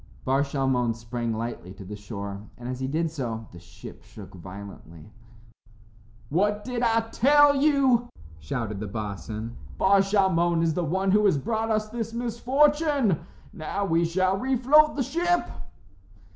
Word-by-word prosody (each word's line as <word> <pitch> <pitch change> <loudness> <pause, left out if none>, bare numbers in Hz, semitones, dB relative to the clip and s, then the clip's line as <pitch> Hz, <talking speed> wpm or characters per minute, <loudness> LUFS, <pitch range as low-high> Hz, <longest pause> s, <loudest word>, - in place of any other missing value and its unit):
Bar 135 +2 +2
Shalmon 135 -4 0
sprang 115 0 -4
lightly 110 -5 -5
to 100 -1 -11
the 105 +3 -7
shore, 100 0 -7
and 120 - -8
as 130 0 -4
he 130 - -2
did 160 +3 -1
so 115 -7 -4
the 85 - -12
ship 85 +1 -12
shook - - -12
violently. 95 -1 -11 1.2
"What 205 +6 +1
did 250 0 -3
I 230 -1 +3
tell 290 +3 +5
you?" 270 -4 +3 0.3
shouted 105 +6 -4
the 105 - -4
boatswain. 105 +2 -5 0.2
"Bar 195 +1 +4
Shalmon 185 -4 +2
is 165 -1 +1
the 175 - -1
one 190 +4 0
who 210 +2 +4
has 190 -7 +4
brought 220 - -2
us 215 -1 0
this 225 0 -4
misfortune. 265 - +2 0.3
Now 195 +5 -3
we 165 -2 +2
shall 185 +3 +1
refloat 265 +5 +4
the 275 - 0
ship." 345 +6 0
170 Hz, 150 wpm, -26 LUFS, -, 1.2 s, tell